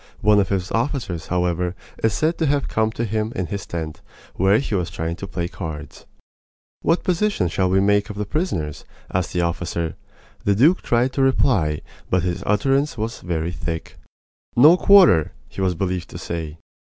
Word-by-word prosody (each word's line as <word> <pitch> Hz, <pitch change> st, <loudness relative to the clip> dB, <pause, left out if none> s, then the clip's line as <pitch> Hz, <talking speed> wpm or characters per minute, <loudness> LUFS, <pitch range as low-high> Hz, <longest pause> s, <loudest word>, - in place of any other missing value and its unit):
One 105 Hz, 0 st, +5 dB
of 100 Hz, -, +1 dB
his 95 Hz, -1 st, -1 dB
officers, 115 Hz, -, -2 dB
however, 90 Hz, 0 st, 0 dB, 0.3 s
is 110 Hz, -, +4 dB
said 160 Hz, +2 st, 0 dB
to 160 Hz, -, +2 dB
have 140 Hz, -1 st, +1 dB
come 110 Hz, 0 st, 0 dB
to 120 Hz, -, -2 dB
him 110 Hz, +1 st, -1 dB
in 90 Hz, -, -1 dB
his 100 Hz, +2 st, -5 dB
tent, 80 Hz, -1 st, -5 dB, 0.3 s
where 95 Hz, +3 st, +3 dB
he 135 Hz, -, -3 dB
was 90 Hz, -4 st, 0 dB
trying 85 Hz, -1 st, -3 dB
to 100 Hz, -, -6 dB
play 85 Hz, -3 st, -3 dB
cards. 80 Hz, -6 st, -8 dB, 0.7 s
"What 170 Hz, -, +1 dB
disposition 185 Hz, -, +1 dB
shall 95 Hz, +2 st, +1 dB
we 95 Hz, +1 st, +3 dB
make 100 Hz, +1 st, +2 dB
of 105 Hz, -, -6 dB
the 105 Hz, -, -2 dB
prisoners?" 100 Hz, -, -2 dB, 0.3 s
asked 90 Hz, -1 st, 0 dB
the 90 Hz, -, 0 dB
officer. 85 Hz, -1 st, -2 dB, 0.5 s
The 100 Hz, -, +2 dB
duke 155 Hz, -, +4 dB
tried 120 Hz, +2 st, +1 dB
to 135 Hz, -, 0 dB
reply, 105 Hz, -, +2 dB, 0.3 s
but 90 Hz, -2 st, +2 dB
his 90 Hz, -1 st, -2 dB
utterance 135 Hz, +7 st, +1 dB
was 110 Hz, +2 st, -4 dB
very 85 Hz, -1 st, -2 dB
thick. 85 Hz, -2 st, -5 dB, 0.6 s
"No 150 Hz, +8 st, +8 dB
quarter!" 180 Hz, -, +6 dB
he -, -, -7 dB
was 95 Hz, -2 st, +1 dB
believed 90 Hz, 0 st, -2 dB
to -, -, -8 dB
say. 80 Hz, -2 st, -5 dB
95 Hz, 180 wpm, -22 LUFS, 85-120 Hz, 0.7 s, No